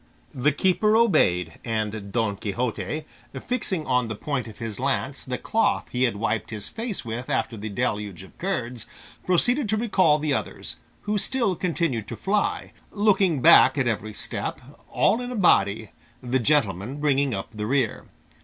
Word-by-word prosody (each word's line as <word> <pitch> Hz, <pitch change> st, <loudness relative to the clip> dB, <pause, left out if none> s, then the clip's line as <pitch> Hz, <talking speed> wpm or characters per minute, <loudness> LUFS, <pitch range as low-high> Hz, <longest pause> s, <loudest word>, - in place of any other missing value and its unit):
The 135 Hz, +4 st, +2 dB
keeper 190 Hz, +8 st, +2 dB
obeyed, 90 Hz, -, +2 dB
and 110 Hz, -3 st, -3 dB
Don 110 Hz, -3 st, 0 dB
Quixote, 120 Hz, +8 st, -3 dB, 0.3 s
fixing 210 Hz, -10 st, -1 dB
on 125 Hz, -2 st, +1 dB
the 110 Hz, -, -4 dB
point 130 Hz, +1 st, -3 dB
of 110 Hz, -, -11 dB
his 110 Hz, -3 st, -6 dB
lance 135 Hz, +1 st, -1 dB
the 125 Hz, -2 st, -3 dB
cloth 225 Hz, -, 0 dB
he 125 Hz, +1 st, +2 dB
had 120 Hz, -, 0 dB
wiped 110 Hz, +3 st, -1 dB
his 105 Hz, -2 st, -5 dB
face 225 Hz, -, -4 dB
with 115 Hz, +2 st, -5 dB
after 115 Hz, +1 st, -1 dB
the 110 Hz, 0 st, -6 dB
deluge 105 Hz, -5 st, -2 dB
of 95 Hz, -, -16 dB
curds, 125 Hz, -11 st, -3 dB, 0.4 s
proceeded 240 Hz, -, +2 dB
to 215 Hz, -, +1 dB
recall 190 Hz, -9 st, +3 dB
the 150 Hz, -1 st, -1 dB
others, -, -, -4 dB, 0.2 s
who 210 Hz, 0 st, -1 dB
still 230 Hz, -4 st, 0 dB
continued 160 Hz, -, -1 dB
to -, -, -5 dB
fly, 205 Hz, +1 st, -1 dB, 0.2 s
looking 195 Hz, -, +2 dB
back 130 Hz, +2 st, +7 dB
at 135 Hz, -, +2 dB
every 110 Hz, -2 st, -2 dB
step, -, -, -4 dB, 0.3 s
all 230 Hz, -, +2 dB
in 245 Hz, 0 st, -5 dB
a -, -, -4 dB
body, 110 Hz, -, +3 dB, 0.3 s
the 130 Hz, +1 st, 0 dB
gentleman 120 Hz, -, +1 dB
bringing 140 Hz, -3 st, +2 dB
up 95 Hz, -, -6 dB
the 105 Hz, -1 st, -4 dB
rear. 130 Hz, -3 st, 0 dB
130 Hz, 165 wpm, -25 LUFS, 110-185 Hz, 0.4 s, back